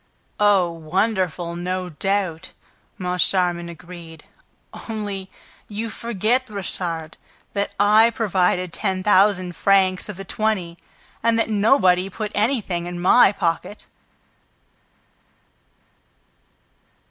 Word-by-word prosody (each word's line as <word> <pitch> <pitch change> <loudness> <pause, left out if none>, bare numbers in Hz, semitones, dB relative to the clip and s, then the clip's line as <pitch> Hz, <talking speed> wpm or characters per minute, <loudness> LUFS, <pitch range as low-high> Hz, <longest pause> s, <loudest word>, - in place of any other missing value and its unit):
"Oh, 200 -4 +4
wonderful, 175 0 -1
no 180 +1 -3
doubt!" 185 0 -2 0.4
Moncharmin 180 -1 0
agreed. 170 -2 -11 0.7
"Only, 205 -3 -4 0.4
you 220 +2 -4
forget, 235 +4 -1
Richard, 170 -5 -5 0.4
that 200 0 -2
I 215 +3 +6
provided 185 -6 0
ten 190 -3 -2
thousand 190 -3 +3
francs 190 -1 +2
of 205 - -6
the 195 - -7
twenty 190 -6 -2 0.4
and 230 0 +2
that 225 -1 0
nobody 195 -4 +3
put 210 +2 -5
anything 205 -6 -1
in 175 0 -5
my 190 +4 +6
pocket!" 185 +2 -3
190 Hz, 95 wpm, -22 LUFS, 175-210 Hz, 0.7 s, I